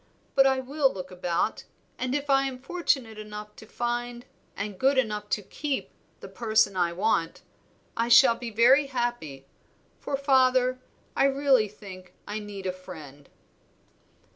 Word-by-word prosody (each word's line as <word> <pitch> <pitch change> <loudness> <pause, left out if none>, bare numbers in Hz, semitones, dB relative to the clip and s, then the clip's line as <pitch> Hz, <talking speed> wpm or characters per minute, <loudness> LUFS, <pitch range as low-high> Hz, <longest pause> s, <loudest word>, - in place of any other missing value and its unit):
But 270 0 +5
I 265 -1 +2
will 270 +1 +1
look 185 -1 -8
about, 180 -2 -2 0.3
and 255 +1 -1
if 290 0 -2
I 275 -1 +3
am 260 -1 -5
fortunate 265 -6 -1
enough 210 0 -9
to 220 - -13
find 240 +1 -3 0.3
and 200 -1 -5
good 270 +1 +3
enough 210 -4 -1
to 210 - -1
keep 290 +6 -4 0.3
the - - -8
person 215 -4 +1
I 175 -2 +1
want, 170 -2 -1 0.5
I 230 0 0
shall 235 +1 +7
be 235 0 -7
very 250 +6 +5
happy; 240 - -3 0.5
for, 275 - -3
father, 255 -2 +3 0.4
I 270 - +3
really 275 -5 +3
think 190 -3 -12
I 210 +1 -3
need 205 -2 -8
a 185 - 0
friend." 155 -7 -12
235 Hz, 150 wpm, -27 LUFS, 200-265 Hz, 0.5 s, shall